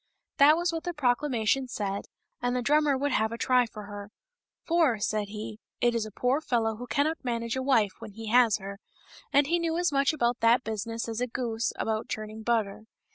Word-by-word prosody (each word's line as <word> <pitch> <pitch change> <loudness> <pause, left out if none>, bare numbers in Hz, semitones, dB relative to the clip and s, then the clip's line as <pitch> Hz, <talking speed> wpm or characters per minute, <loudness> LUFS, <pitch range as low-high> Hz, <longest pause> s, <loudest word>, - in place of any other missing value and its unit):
That 295 +3 +7
was 345 0 0
what 325 - -3
the 350 -1 -4
proclamation 260 -2 +1
said, 200 -4 -3 0.4
and 245 0 0
the 250 - -1
drummer 295 0 +3
would 285 +2 -1
have 220 -1 +1
a 230 - -4
try 250 0 +3
for 215 -1 -9
her; 205 0 -8 0.3
" - - -65
for," 325 -8 +3
said 210 0 -1
he, 210 +1 -7
" - - -64
it 240 0 +2
is 225 -2 -1
a - - -10
poor 250 +8 0
fellow 225 -6 0
who 245 +2 -7
cannot 300 +5 0
manage 235 -2 -2
a 260 - -1
wife 230 -7 +3
when 210 - -9
he 225 +1 -7
has 235 -2 +5
her" 200 0 -8 0.3
— - - -21
and 285 +1 +4
he 340 +4 +1
knew 330 -1 -1
as 350 -2 +1
much 275 0 +3
about 240 -5 0
that 235 +2 +4
business 225 +2 -4
as 225 +1 -4
a 250 - 0
goose 230 -2 -2
about 220 0 -2
churning 215 0 -5
butter. 220 -2 -1
235 Hz, 225 wpm, -28 LUFS, 220-275 Hz, 0.4 s, That